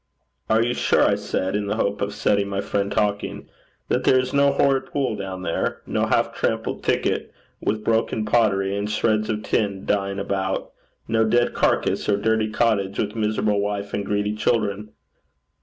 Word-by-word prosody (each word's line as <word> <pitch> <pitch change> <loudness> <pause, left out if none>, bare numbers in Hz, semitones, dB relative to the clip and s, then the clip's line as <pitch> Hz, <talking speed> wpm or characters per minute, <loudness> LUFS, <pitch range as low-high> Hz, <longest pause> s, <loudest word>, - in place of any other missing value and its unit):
'Are 110 +1 +4
you 120 +1 0
sure,' - - +3
I - - +3
said, 95 +1 -2
in 105 -1 -1
the 100 - -1
hope 100 +1 -1
of 100 - -1
setting 100 -1 +1
my 100 0 -2
friend 100 0 -1
talking, 100 0 -1 0.4
'that - - 0
there 130 - +5
is 130 0 -1
no 140 0 +4
horrid 135 -2 +2
pool 135 -6 -1
down 95 -2 -6
there? 80 - -2
no - - 0
half - - +1
trampled - - -2
thicket, - - 0 0.3
with 105 0 -1
broken 110 -1 0
pottery 100 -4 +2
and 100 +1 -2
shreds 110 0 +1
of 105 -1 -2
tin 100 -3 -1
lying 100 -1 0
about? 95 -1 -2 0.4
no 110 0 +2
dead 120 +2 +2
carcass, - - +1
or 100 - +3
dirty 110 +1 +1
cottage, 105 -3 +1
with 105 0 -2
miserable 105 -1 +1
wife 100 0 -3
and 100 - -2
greedy 105 0 0
children? 105 -2 0
105 Hz, 175 wpm, -23 LUFS, 100-110 Hz, 0.4 s, there